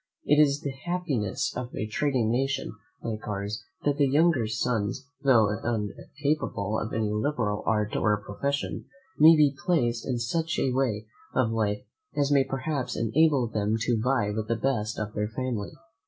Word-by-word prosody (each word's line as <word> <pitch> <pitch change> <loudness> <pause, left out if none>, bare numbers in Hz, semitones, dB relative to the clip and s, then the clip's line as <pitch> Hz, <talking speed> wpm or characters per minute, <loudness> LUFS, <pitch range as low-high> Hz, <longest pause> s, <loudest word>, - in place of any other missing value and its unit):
It 150 +1 +5
is 145 0 +3
the 140 - -3
happiness 140 - -2
of 125 0 -5
a - - -2
trading 120 0 0
nation, 135 +3 -1 0.3
like 110 -2 -4
ours, 105 +1 -3 0.2
that 145 -1 +2
the 140 - +5
younger 145 -4 +3
sons, 110 +3 -1 0.2
tho' 120 -7 +5
uncapable 115 0 -2
of 110 - -4
any 110 -2 0
liberal 105 -2 0
art 105 -1 +1
or 105 -1 +2
profession, 140 +8 -3 0.3
may 160 +2 +9
be 150 -3 +4
placed 125 -10 +1
in 125 - 0
such 160 +8 -1
a 130 - +1
way 120 -5 0 0.3
of 120 -3 +2
life 105 -2 0 0.3
as 140 0 +2
may 140 -1 +5
perhaps 135 0 -3
enable 140 +3 +3
them 105 -1 0
to 115 0 +1
vie 125 -4 +1
with 110 +1 -3
the 115 - +1
best 110 -2 -1
of 105 0 -4
their 105 0 -1
family. 115 -2 -3
120 Hz, 165 wpm, -27 LUFS, 110-140 Hz, 0.3 s, may